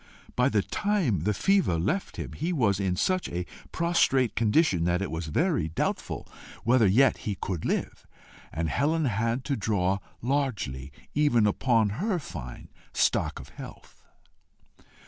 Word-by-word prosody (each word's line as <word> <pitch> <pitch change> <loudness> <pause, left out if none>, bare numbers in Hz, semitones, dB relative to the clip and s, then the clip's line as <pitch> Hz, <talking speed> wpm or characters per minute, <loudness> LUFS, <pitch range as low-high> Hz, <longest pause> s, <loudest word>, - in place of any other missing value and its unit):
By 125 +2 +3
the 105 -6 +1
time 180 - 0
the 105 - +2
fever 195 - +2
left 100 - -2
him, - - -5
he 165 +4 -2
was 110 - +2
in 95 -2 0
such 185 - 0
a 90 +1 -3 0.3
prostrate 135 - +2
condition, 105 - +3
that 90 0 +2
it 100 - -3
was 80 0 -4
very 150 - +1
doubtful 80 - -3 0.4
whether 120 -2 +4
yet 130 +8 +4
he 105 - -4
could 90 -2 -4
live, - - -2 0.4
and 80 +1 -2
Helen 150 - +1
had 110 -7 -1
had 120 +3 -1
to 140 - 0
draw 100 -4 0 0.2
largely 110 - -2 0.2
even 145 -7 +3
upon 110 +1 +2
her 210 -4 +1
fine 65 - -8 0.2
stock - - +1
of - - -11
health. - - -12
115 Hz, 150 wpm, -27 LUFS, 90-145 Hz, 0.4 s, whether